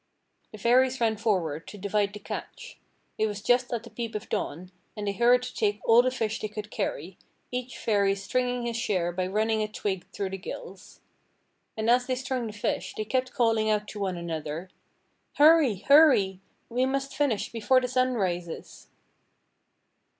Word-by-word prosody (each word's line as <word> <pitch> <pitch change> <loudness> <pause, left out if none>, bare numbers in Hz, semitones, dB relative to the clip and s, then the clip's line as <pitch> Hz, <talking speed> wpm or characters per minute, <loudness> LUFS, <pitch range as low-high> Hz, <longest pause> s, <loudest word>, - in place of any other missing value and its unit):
The 215 - -9
Fairies 250 +4 +3
ran 225 -2 +2
forward 180 -8 -1
to 210 - -9
divide 205 +1 0
the - - -6
catch. - - -8 0.4
It 220 - +3
was 205 -1 -4
just 245 +1 +2
at 235 -2 -2
the 235 - -12
peep 230 -2 -5
of 210 - -5
dawn, 175 +5 -3 0.3
and 210 - -4
they 200 - 0
hurried 240 +4 +4
to 250 - -6
take 205 -1 0
all 230 +1 +7
the 255 - +1
fish 220 -4 -2
they 215 - -3
could 210 0 -7
carry, 175 +5 -4 0.3
each 250 0 -4
Fairy 200 -3 +2
stringing 245 +5 -1
his 235 -1 -2
share 185 -6 0
by 180 +1 -2
running 220 +3 +1
a 215 - 0
twig 200 -3 -4
through 195 -2 -3
the 195 - -5
gills. 185 +1 -9 0.8
And 220 0 -1
as 245 +1 +4
they 255 - 0
strung 255 -2 -3
the - - -5
fish 210 - -3
they 215 - -2
kept 255 +2 -1
calling 225 -2 +2
out 210 -1 +1
to 210 - -7
one 190 -3 -2
another: 165 +1 -5 0.6
"Hurry! 300 -6 +6
hurry! 270 -11 +6 0.3
We 250 +2 0
must 275 +1 -2
finish 280 -8 0
before 235 +3 +3
the 250 - -2
sun 255 0 +1
rises." 175 -5 -4
220 Hz, 180 wpm, -27 LUFS, 195-250 Hz, 0.8 s, all